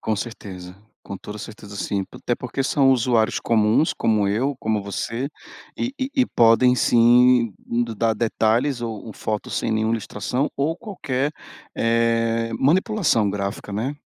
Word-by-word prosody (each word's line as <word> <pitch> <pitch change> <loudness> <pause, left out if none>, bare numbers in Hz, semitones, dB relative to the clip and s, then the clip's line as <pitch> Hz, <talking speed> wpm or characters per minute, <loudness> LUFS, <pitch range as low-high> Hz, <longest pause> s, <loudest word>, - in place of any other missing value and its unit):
Com 110 -1 -1
certeza. 95 -5 -7 0.3
Com 100 - -7
toda 105 +3 -9
certeza 105 -1 -9
sim, 100 0 -2
até 120 - -2
porque 130 +3 -4
são 135 -1 +3
usuários 120 -3 +2
comuns, 110 +6 +2
como 105 -3 +1
eu, 125 +8 0
como 110 -3 -1
você, 115 +6 -3 0.5
e 245 - -2
e 260 +1 -2
e 260 -3 +3
podem, 120 +2 +4
sim, 120 -2 +4
d 115 -1 -2
dar 115 +1 +1
detalhes 115 +3 +1
ou 115 -2 -5
fotos 105 +1 -4
sem 115 - -1
nenhum 110 0 +1
ilustração, 115 +5 -2
ou 150 +4 0
qualquer, 150 - -3 0.5
eh, 115 0 +1
manipulação 165 - +2
gráfica, 100 0 -4
né. 120 +8 -2
115 Hz, 145 wpm, -22 LUFS, 105-130 Hz, 0.5 s, podem